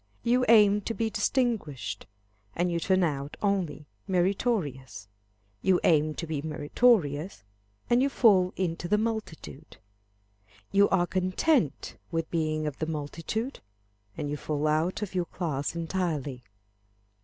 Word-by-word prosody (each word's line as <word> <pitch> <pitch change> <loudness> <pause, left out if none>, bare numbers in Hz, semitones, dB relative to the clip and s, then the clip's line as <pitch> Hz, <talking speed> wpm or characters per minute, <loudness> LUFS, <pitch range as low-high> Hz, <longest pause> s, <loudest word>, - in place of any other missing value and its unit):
You 245 +2 +3
aim 210 -2 +6
to 230 - -2
be 225 -1 -1
distinguished, 215 - -1 0.5
and 175 +1 0
you 170 - 0
turn 185 +2 +2
out 145 -3 -2
only 190 -7 -1 0.2
meritorious. 180 - -1 0.5
You 185 -2 +3
aim 155 -1 +3
to 170 - -4
be 155 -3 -3
meritorious, 155 - +1 0.4
and 240 +1 +3
you 275 - +2
fall 195 -9 +4
into 175 -2 -2
the 210 +4 +3
multitude. 215 -9 -5 0.9
You 200 +1 +4
are 175 -2 +3
content 185 - 0
with 165 -1 -3
being 155 -2 -1
of 150 -3 -4
the 155 - -2
multitude, 165 - -4 0.6
and 145 - -3
you 145 +1 -3
fall 150 0 -2
out 160 +6 +1
of 200 - -6
your 180 -2 0
class 160 -4 -3
entirely. 165 -6 -2
175 Hz, 130 wpm, -28 LUFS, 155-205 Hz, 0.9 s, aim